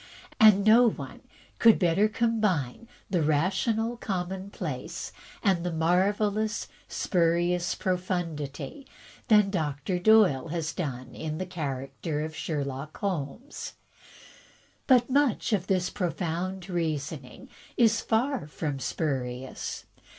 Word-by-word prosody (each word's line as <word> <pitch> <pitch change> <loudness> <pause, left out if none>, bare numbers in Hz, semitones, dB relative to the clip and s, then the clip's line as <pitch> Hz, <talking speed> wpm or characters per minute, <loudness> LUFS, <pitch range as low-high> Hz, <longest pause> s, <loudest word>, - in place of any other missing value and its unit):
And 210 -2 +7
no 230 +2 +7
one - - -8 0.4
could 230 -1 +7
better 185 +3 +3
combine 215 - 0 0.2
the 180 -4 +2
rational 190 +10 +1
commonplace 185 - -4 0.3
and 185 -4 +2
the 180 - -1
marvelous 205 +6 +1
* - - -29
spurious 175 0 +1
profundity' 180 - -3 0.4
than 210 -3 +5
Doctor 160 +1 -1
Doyle 185 -8 +5
has 165 -1 -3
done 130 -7 -4
in 155 -1 -4
the 185 - -3
character 145 -2 -4
of 155 0 -5
Sherlock 140 -1 -4
Holmes. 195 - -4 1.1
But 250 -3 +5
much 270 -4 +2
of 190 -3 0
this 185 -2 +1
profound 180 +1 -3
reasoning 160 - -3 0.3
is 225 -1 +4
far 240 - 0
from 150 -2 -4
spurious. 130 -3 -3
180 Hz, 105 wpm, -28 LUFS, 155-210 Hz, 1.1 s, And